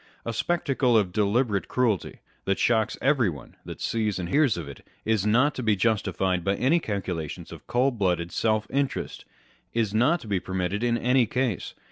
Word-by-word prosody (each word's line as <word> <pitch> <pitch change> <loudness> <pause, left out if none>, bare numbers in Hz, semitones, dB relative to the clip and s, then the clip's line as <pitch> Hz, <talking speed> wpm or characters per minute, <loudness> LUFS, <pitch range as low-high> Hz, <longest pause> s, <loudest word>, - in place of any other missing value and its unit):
A 115 - -2
spectacle 135 -3 +1
of 95 -4 +1
deliberate 105 0 +1
cruelty, 115 -7 -1 0.2
that 100 +1 +1
shocks 110 -2 +1
everyone 120 - 0
that - - -8
sees 110 -3 -1
and 90 -2 -4
hears 140 - +3
of 80 -4 -5
it, 70 - -10 0.2
is 110 -2 +1
not 130 +7 +3
to - - -5
be 110 -3 +2
justified 95 -4 0
by 100 +2 +1
any 145 +10 +2
calculations 95 - -4
of - - -11
cold 125 -1 +1
blooded 90 -3 0
self 110 -1 +1
interest 140 0 -2 0.5
â€¢is 110 -3 0
not 130 +11 +3
to - - -11
be 100 -3 0
permitted 95 +4 -2
in 120 -1 +2
any 125 0 +3
case. 125 -3 -2
110 Hz, 175 wpm, -26 LUFS, 95-125 Hz, 0.5 s, hears